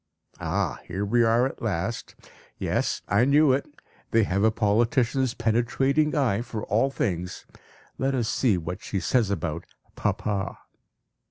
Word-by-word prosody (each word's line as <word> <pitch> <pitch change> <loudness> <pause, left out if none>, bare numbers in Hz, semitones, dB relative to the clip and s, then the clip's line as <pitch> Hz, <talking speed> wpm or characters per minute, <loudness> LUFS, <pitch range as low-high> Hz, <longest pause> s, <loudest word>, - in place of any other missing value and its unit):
(Ah! - - -1
Here 95 +4 -2
we 120 +4 +2
are 115 +2 +3
at 135 - -5
last! 105 +1 -3 0.4
Yes, - - -1
I 100 +5 +3
knew 140 +1 +5
it; 135 - -1 0.4
they 115 0 +3
have 100 0 0
a 110 - +6
politician's 120 +4 +1
penetrating 120 +7 +1
eye 125 -8 +1
for 110 -3 -5
all 115 +7 +2
things. 90 -9 -3 0.5
Let 135 +1 +1
us 120 -3 0
see 110 -5 +2
what 85 +1 -5
she 100 - -3
says 115 +1 +1
about 85 -4 -3 0.3
"Papa.") 100 -2 -2
115 Hz, 145 wpm, -26 LUFS, 100-130 Hz, 0.5 s, a